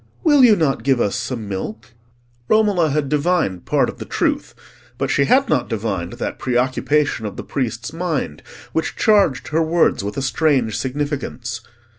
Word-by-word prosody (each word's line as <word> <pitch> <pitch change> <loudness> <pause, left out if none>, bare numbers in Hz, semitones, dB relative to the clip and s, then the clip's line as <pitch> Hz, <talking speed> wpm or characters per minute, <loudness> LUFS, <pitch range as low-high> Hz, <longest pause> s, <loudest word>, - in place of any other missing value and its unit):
Will 295 -6 +5
you 230 -4 +7
not 155 -7 0
give 135 -2 +2
us 100 - 0
some 115 -1 -4
milk?" 110 +4 -6 0.6
Romola 205 -7 +3
had 145 0 0
divined 150 - 0
part - - +2
of - - -7
the - - -6
truth, - - -1 0.4
but - - -1
she 140 - +3
had 270 - +3
not - - 0
divined 100 -6 -3
that - - -5
preoccupation 130 0 0
of 100 - -8
the - - -5
priest's 120 0 -3
mind 160 - -3 0.3
which 160 - -1
charged 200 - +2
her 160 +2 +1
words 160 - +2
with 100 +1 -5
a 135 - -1
strange 135 -4 +1
significance. 130 -4 -3
135 Hz, 165 wpm, -20 LUFS, 115-160 Hz, 0.6 s, you